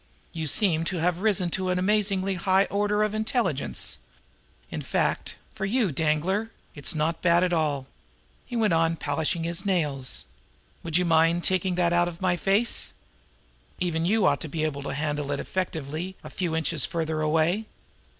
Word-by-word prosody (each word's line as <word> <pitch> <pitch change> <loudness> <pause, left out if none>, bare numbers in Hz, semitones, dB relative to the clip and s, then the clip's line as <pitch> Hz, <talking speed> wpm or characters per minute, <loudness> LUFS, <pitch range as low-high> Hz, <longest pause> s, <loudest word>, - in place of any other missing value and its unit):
You 160 -2 -3
seem 165 -2 +4
to 180 - -1
have 175 +2 0
risen 190 -5 +2
to 185 +1 -1
an 180 - +1
amazingly 195 0 +1
higher 190 +2 +2
order 205 +1 +1
of 215 0 0
intelligence. 220 +3 -1 0.7
In - - -4
fact, - - -1 0.2
for 200 - -6
you, 210 -1 +1
Danglar, 160 +9 0 0.2
it 145 - -5
is - - +2
not 155 +2 -1
at 175 +1 +3
all 150 -4 +1
bad!" 135 - -25 0.6
He 245 - -6
went 220 -5 +2
on 165 0 +2
polishing 160 +2 -1
his 170 0 -2
nails. 150 -9 0 0.6
"Would 165 -1 0
you 180 - +2
mind 165 +1 +3
taking 185 -1 +1
that 175 -1 +2
thing 175 0 +2
out 175 - +3
of 170 -1 -7
my 185 -2 +2
face? 200 +6 +1 0.8
Even 165 -2 -1
you 205 +3 +2
ought - - +2
to 160 - -5
be 155 +1 -2
able 145 -2 -2
to 140 - -4
handle 145 -1 -2
it 140 - -1
effectively 170 0 -3
a - - -9
few 175 -3 -2
inches 160 -3 0
farther 160 -1 -1
away." 160 +7 +1
175 Hz, 180 wpm, -26 LUFS, 160-190 Hz, 0.8 s, seem